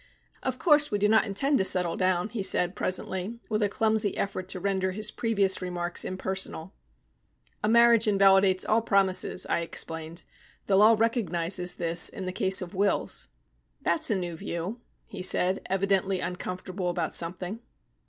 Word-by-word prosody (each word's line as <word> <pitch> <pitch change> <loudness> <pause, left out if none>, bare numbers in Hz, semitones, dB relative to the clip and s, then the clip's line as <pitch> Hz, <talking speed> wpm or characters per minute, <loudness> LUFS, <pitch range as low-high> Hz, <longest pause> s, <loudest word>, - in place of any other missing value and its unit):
"Of 260 -1 -3
course 295 -1 +4
we 205 - -1
do 205 +1 +2
not 220 +1 +3
intend 270 +8 0
to - - +2
settle 180 -3 +1
down," 185 +1 0
he 225 -3 -5
said 180 -1 +1
presently, 190 +4 -3
with 215 -1 -1
a 205 - +1
clumsy 215 -2 0
effort 190 -2 -3
to 185 - -4
render 190 0 -1
his 215 +2 -1
previous 200 -5 +1
remarks 175 -1 -1
impersonal. 190 -1 -3 0.9
"A 210 - +1
marriage 235 -1 +5
invalidates 195 -2 +4
all 220 +2 +2
promises," 195 -4 +1
I - - 0
explained. 165 0 -3 0.4
"The 195 - +1
law 215 +3 +6
recognises 180 -6 0
this 170 0 +3
in 190 - -8
the 185 - -3
case 190 +1 +2
of 180 - -10
wills." 200 +1 0 0.6
"That's 315 -3 +1
a 215 - +1
new 175 -3 -4
view," 170 +8 -6 0.2
he - - -9
said, 185 0 +2
evidently 195 0 0
uncomfortable 180 +1 -5
about 175 -2 -3
something. 180 +5 -3
190 Hz, 160 wpm, -27 LUFS, 180-210 Hz, 0.9 s, law